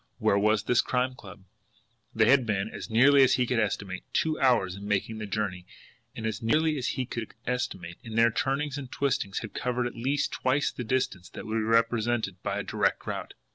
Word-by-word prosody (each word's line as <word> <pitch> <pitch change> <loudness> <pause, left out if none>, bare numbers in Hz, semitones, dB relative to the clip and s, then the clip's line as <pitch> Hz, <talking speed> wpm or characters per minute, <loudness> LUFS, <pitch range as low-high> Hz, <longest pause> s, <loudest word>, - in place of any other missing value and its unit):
Where 100 - +2
was 105 0 +2
this 120 +2 +3
Crime 130 0 0
Club? 100 -5 -13 0.7
They 110 -1 +4
had 140 -2 +5
been, 100 -1 0
as - - -7
nearly 135 +5 +6
as 130 - +5
he 125 - +2
could 120 -1 0
estimate, 100 -3 -2
two 155 -1 +1
hours 120 -9 +3
in 100 +1 -8
making 105 +2 -1
the 105 - -5
journey; 95 -4 -3 0.5
and, 110 - -5
as 110 0 -2
nearly 155 +7 +2
as 125 - -2
he 130 - 0
could 115 -2 -6
estimate, 90 -9 -3
in 110 -1 -8
their 115 +1 +5
turnings 140 +3 -1
and 130 -3 -8
twistings 120 -8 -1
had 110 - -8
covered 125 0 -1
at 120 - -3
least 135 +5 -1
twice 130 +3 +1
the 125 - -6
distance 110 -7 -1
that - - -9
would 110 +1 -2
be - - 0
represented 115 -3 +1
by 100 0 -2
a 105 - -2
direct - - 0
route. - - -5
115 Hz, 210 wpm, -28 LUFS, 105-130 Hz, 0.7 s, nearly